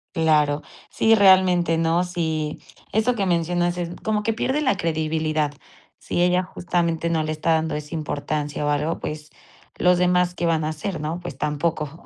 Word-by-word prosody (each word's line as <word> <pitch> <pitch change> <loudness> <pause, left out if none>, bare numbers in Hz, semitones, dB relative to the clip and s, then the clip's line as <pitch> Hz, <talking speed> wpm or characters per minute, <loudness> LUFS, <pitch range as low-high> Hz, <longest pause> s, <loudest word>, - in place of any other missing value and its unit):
Claro. 150 -3 +2 0.3
Sí, 225 0 +3
realmente 185 -4 +5
no. 165 +2 +2
Sí, 160 -4 -2 0.3
eso 220 +4 +1
que 200 -3 0
mencionas 175 0 0
es 175 -1 -3
como 215 -1 0
que 225 - 0
pierde 260 +6 -1
la 265 -3 +1
credibilidad. 155 -2 -1 0.5
Si - - -2
ella 180 +1 +3
justamente 170 -2 -1
no 160 -2 +1
le 155 - -2
está 155 +1 +1
dando 160 0 0
esa 150 +1 -6
importancia 150 -1 -3
o - - +1
algo, 150 +3 0
pues, 150 0 -6 0.5
¿los 180 0 +4
demás 180 0 +2
qué 175 - -2
van 165 -2 +1
a 155 - -1
hacer, 160 +3 -4
no? 160 +3 -3
Pues 175 -6 -8
tampoco. 150 +1 -2
165 Hz, 175 wpm, -23 LUFS, 155-180 Hz, 0.5 s, realmente